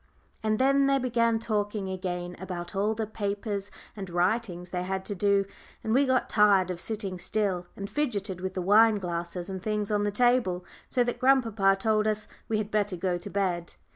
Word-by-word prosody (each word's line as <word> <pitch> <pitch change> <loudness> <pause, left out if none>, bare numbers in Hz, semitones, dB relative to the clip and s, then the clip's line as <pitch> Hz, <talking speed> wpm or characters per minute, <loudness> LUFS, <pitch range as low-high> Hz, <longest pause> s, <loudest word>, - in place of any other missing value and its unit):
And 215 0 +1
then 275 +2 +4
they 275 0 +4
began 230 -3 +2
talking 210 -2 -2
again 180 -1 -4
about 175 -1 -6
all 210 +3 +1
the 220 0 -2
papers 205 -1 -3 0.3
and 195 -3 -6
writings 180 0 0
they 180 - -2
had 190 +1 -3
to 205 - -3
do, 200 0 +2 0.4
and 220 - 0
we 275 +2 +4
got 260 0 +2
tired 200 -4 +4
of 175 -1 -5
sitting 205 -5 -3
still, 185 -1 -1
and 200 - -5
fidgeted 200 -10 -2
with 190 0 -4
the 185 - -2
wine 215 +3 +6
glasses 175 -2 -4
and 190 -1 -5
things 210 0 -2
on 205 -1 +2
the 205 - +1
table, 210 -5 +2 0.2
so 250 - +3
that 245 0 -3
grandpapa 225 -7 +4
told 215 +1 +2
us 215 0 -1 0.2
we 220 - +1
had 210 0 -3
better 205 -2 0
go 175 0 -1
to 180 - -8
bed. 180 -4 -2
205 Hz, 195 wpm, -28 LUFS, 185-220 Hz, 0.4 s, wine